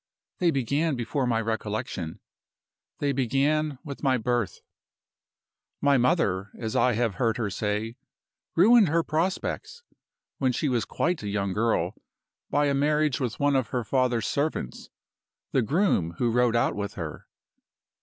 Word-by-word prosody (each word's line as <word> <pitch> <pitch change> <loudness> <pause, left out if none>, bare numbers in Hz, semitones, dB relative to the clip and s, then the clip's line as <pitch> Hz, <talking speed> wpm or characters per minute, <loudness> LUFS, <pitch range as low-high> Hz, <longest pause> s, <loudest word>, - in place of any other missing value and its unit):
They 175 - +3
began 140 +2 0
before 125 +2 -1
my 115 -2 +1
recollection. 105 -6 -3 0.8
They 145 -1 0
began 140 +3 +1
with 140 -4 -7
my 130 -3 +2
birth. 120 -2 -1 1.2
"My 140 -2 +4
mother 110 - +1
(as 110 -1 -4
I 125 - +3
have 115 -1 0
heard 115 -2 +2
her 110 -4 -2
say) 105 +3 -2 0.6
ruined 215 +4 +6
her 165 +2 +2
prospects, 185 - -2 0.6
when 130 -2 +2
she 145 - 0
was 120 -3 0
quite 175 0 -1
a 105 - -4
young 100 -2 -1
girl, 115 +3 +1 0.6
by 145 0 +2
a 140 - +2
marriage 150 -1 +2
with 125 -5 -3
one 145 -1 +3
of 130 -4 +1
her 125 0 -2
father's 125 -1 +1
servants 140 - -2 0.6
the 130 - +3
groom 120 - +1
who 120 -1 +1
rode 120 0 +2
out 115 - +2
with 100 0 -4
her. 80 -4 -6
125 Hz, 145 wpm, -26 LUFS, 110-145 Hz, 1.2 s, ruined